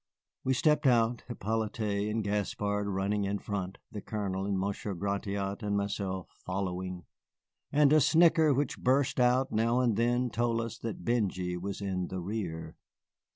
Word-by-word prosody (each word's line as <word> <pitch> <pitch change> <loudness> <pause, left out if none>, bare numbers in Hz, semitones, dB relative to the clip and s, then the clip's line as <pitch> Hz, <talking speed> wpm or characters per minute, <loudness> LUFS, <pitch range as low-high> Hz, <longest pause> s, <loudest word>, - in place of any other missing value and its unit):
We 130 0 +2
stepped 150 +1 +3
out, 120 -1 +3
Hippolyte 110 -2 -1
and 110 0 -1
Gaspard 105 0 -1
running 100 +1 0
in 100 +1 -1
front, 100 -2 -4
the 105 - -6
Colonel 100 -3 -3
and 100 -1 0
Monsieur 100 +1 -2
Gratiot 100 +1 -2
and 100 -1 0
myself 100 -2 -2
following; 90 -1 -3 0.7
and 145 0 +5
a 155 - +6
snicker 160 +1 +5
which 140 0 0
burst 135 +1 +2
out 125 +2 +3
now 115 +3 +2
and 120 -4 +2
then 120 +1 +1
told 115 0 +1
us 115 0 -4
that 115 -2 -5
Benjy 95 -7 0
was 95 +3 -5
in 95 -2 -2
the 95 - -4
rear. 85 -5 -4
105 Hz, 155 wpm, -30 LUFS, 95-120 Hz, 0.7 s, a